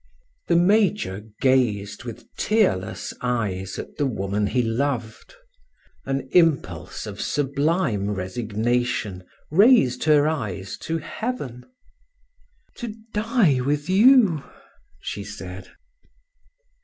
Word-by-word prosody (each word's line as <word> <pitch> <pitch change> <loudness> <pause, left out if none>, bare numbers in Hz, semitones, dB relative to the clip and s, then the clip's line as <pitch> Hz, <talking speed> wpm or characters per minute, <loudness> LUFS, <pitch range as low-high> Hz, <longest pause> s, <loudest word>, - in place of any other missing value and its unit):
The - - +3
major 185 - +2
gazed 120 -5 +1
with 115 -3 -8
tearless 200 - 0
eyes 100 -7 -2
at - - -8
the 145 - +1
woman 100 -3 -1
he 125 +4 +1
loved; 120 - -2 0.7
an 135 -1 -2
impulse 165 -5 +1
of - - -6
sublime 140 - 0
resignation 110 +1 -2 0.3
raised 190 - +5
her 150 -1 +5
eyes 105 - -3
to 165 +1 -2
heaven. 160 - -5 1.1
"To 235 -4 -5 0.2
die 210 - +2
with 145 +4 -1
you!" 205 - +5 0.6
she 100 - -5
said. 95 -2 -8
130 Hz, 95 wpm, -23 LUFS, 105-165 Hz, 1.1 s, raised